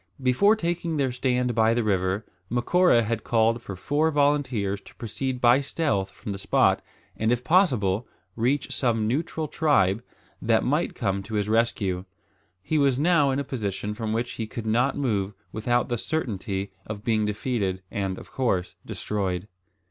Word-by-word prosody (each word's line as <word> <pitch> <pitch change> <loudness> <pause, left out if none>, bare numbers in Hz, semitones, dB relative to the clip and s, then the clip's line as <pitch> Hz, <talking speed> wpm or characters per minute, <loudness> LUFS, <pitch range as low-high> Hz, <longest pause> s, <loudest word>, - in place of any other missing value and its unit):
Before 165 - +4
taking 170 -4 -2
their 135 -3 +1
stand 125 -1 0
by 115 0 +3
the 120 - +1
river, 95 0 0 0.2
Macora 120 +2 +3
had 110 0 -2
called 115 0 +2
for 100 - -7
four 145 +11 +1
volunteers 135 -9 +1
to - - -16
proceed 125 +3 -3
by 125 +3 +5
stealth 135 -10 -1
from 100 - -8
the 100 - -5
spot, 100 - +3 0.3
and 110 +1 0
if 120 0 0
possible 125 - +2 0.3
reach 130 +5 0
some 115 -4 +1
neutral 155 +5 -1
tribe 120 - +2 0.4
that - - +2
might - - 0
come 100 0 -1
to 105 +3 -6
his 105 -1 0
rescue. 105 -5 +1 0.6
He 155 +9 +1
was 140 -3 +3
now 155 -1 +4
in 135 - 0
a 140 - 0
position 105 -5 -3
from 110 0 -3
which 115 +2 -1
he 110 - -4
could 115 0 -6
not 120 +5 +2
move 105 -7 -1 0.2
without 120 +3 0
the 120 -2 -2
certainty 100 - -3 0.2
of 105 -1 -6
being 110 -2 +1
defeated 105 -3 -2
and 95 -4 -2
of - - -12
course 100 -9 0
destroyed. 95 -2 -3
115 Hz, 165 wpm, -26 LUFS, 100-135 Hz, 0.6 s, by